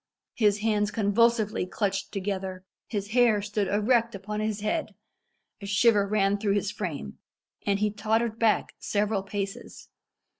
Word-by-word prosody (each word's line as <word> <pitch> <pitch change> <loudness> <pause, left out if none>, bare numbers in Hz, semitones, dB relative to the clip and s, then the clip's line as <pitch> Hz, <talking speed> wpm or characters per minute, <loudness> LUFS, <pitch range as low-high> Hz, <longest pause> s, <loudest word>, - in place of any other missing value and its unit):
His 210 -2 +2
hands 210 -2 +1
convulsively 215 -1 +2
clutched 195 0 -2
together; 190 -2 -4 0.2
his 205 -2 -3
hair 235 -2 +4
stood 205 0 -2
erect 230 +2 +2
upon 210 +2 -5
his 215 -1 -2
head; 215 -1 -2 0.7
a 200 - -6
shiver 205 0 +4
ran 200 -1 +2
through 200 -1 +1
his 205 0 0
frame; 155 - -5 0.5
and 200 -1 +3
he 210 +1 +1
tottered 220 +2 0
back 225 -2 +2
several 205 -1 0
paces. 195 0 -6
205 Hz, 140 wpm, -27 LUFS, 200-220 Hz, 0.7 s, hair